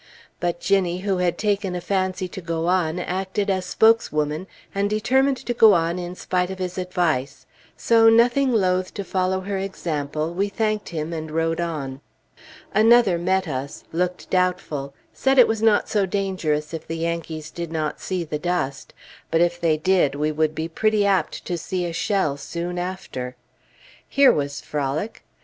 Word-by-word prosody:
But 175 -1 -1
Ginnie, 185 -2 +1
who 195 -1 0
had 180 -1 0
taken 200 -3 0
a - - -2
fancy 185 0 -1
to 190 - -7
go 165 -1 -2
on, 175 -2 +1
acted 190 +3 -2
as 185 -1 -1
spokeswoman, 180 -7 +2 0.3
and 200 +1 0
determined 260 +6 +2
to 240 - -1
go 225 -3 +7
on 170 +1 0
in 175 0 -5
spite 180 0 -1
of 190 - -5
his 185 0 -4
advice, 155 -8 -1 0.3
so, 225 -1 +5
nothing 240 +4 +4
loath 185 -4 +1
to 200 - -3
follow 190 0 0
her 195 0 -3
example, 155 -4 -3
we 200 +3 0
thanked 215 0 -1
him, 160 0 -4
and 160 -1 -5
rode 165 +1 0
on. 140 -5 -4 0.7
Another 215 -3 +5
met 190 +1 +1
us; 140 -1 -5
looked 180 +2 -2
doubtful, 155 -7 -1 0.2
said 270 0 +1
it 250 - +8
was 225 -1 -1
not 220 -2 +3
so 205 -3 +1
dangerous 175 -6 -1
if 160 - -6
the 165 - -4
Yankees 165 -2 -4
did 170 -1 -6
not 155 -2 -2
see 185 -2 -2
the 150 -2 -4
dust; 150 -5 -2 0.3
but 165 - +2
if 175 0 +1
they 160 -2 +2
did, 160 -4 +2
we 150 +1 0
would 155 0 0
be 160 +1 -2
pretty 215 +4 +1
apt 195 -5 0
to 175 -2 -2
see 180 +2 -2
a 170 - -4
shell 180 -6 0
soon 175 +4 -4
after. 155 -9 -5 0.7
Here 280 -1 +6
was 145 -1 -2
frolic! 150 +8 -3
180 Hz, 170 wpm, -23 LUFS, 160-195 Hz, 0.7 s, it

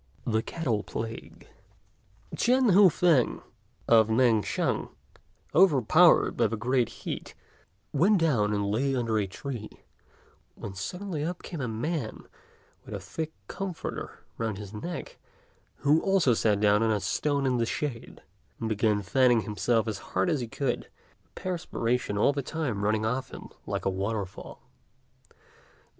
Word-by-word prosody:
THE 110 -1 +1
CATTLE 120 -7 -2
PLAGUE. 115 +2 -7 0.9
Ch'ên 250 -2 +3
Hua 195 0 +8
fêng, 160 -7 +2 0.4
of 110 -2 +6
Mêng 115 -2 +3
shan, - - -1 0.6
overpowered 155 - +5
by - - +3
the 115 - -3
great 125 +1 +1 0.2
heat, - - -5 0.6
went 180 +5 +3
and 105 -9 +1
lay 135 +6 +1
down 130 - 0
under 115 -2 0
a 100 - -1
tree, 115 +2 -6 0.9
when 100 - -7
suddenly 175 - -4
up 175 +3 -4
came 165 -5 -6
a 125 - -2
man 120 +3 -3 0.6
with - - -7
a - - -4
thick 160 -1 -5 0.2
comforter 195 -4 -6
round 110 -3 -2
his 105 0 -9
neck, 170 +11 -6 0.7
who 150 +3 +5
also 190 -10 +3
sat 105 -2 +2
down 105 0 +4
on 115 - +2
a 105 -1 +2
stone 140 +8 0
in 130 -2 +2
the 115 -1 0
shade, 130 -4 -4 0.4
and 110 - -2
began 105 -1 +1
fanning 125 +2 +3
himself 110 +2 0
as 110 - -3
hard 175 - -1
as 155 - +1
he 120 - -4
could, 125 +2 -2 0.4
the - - -36
perspiration 125 - -2
all 125 +7 +3
the 140 - -2
time 135 -8 -3
running 105 +1 +1
off 125 +4 -2
him - - -9 0.2
like - - -3
a - - +3
waterfall. 100 0 -4
120 Hz, 150 wpm, -28 LUFS, 110-155 Hz, 0.9 s, Hua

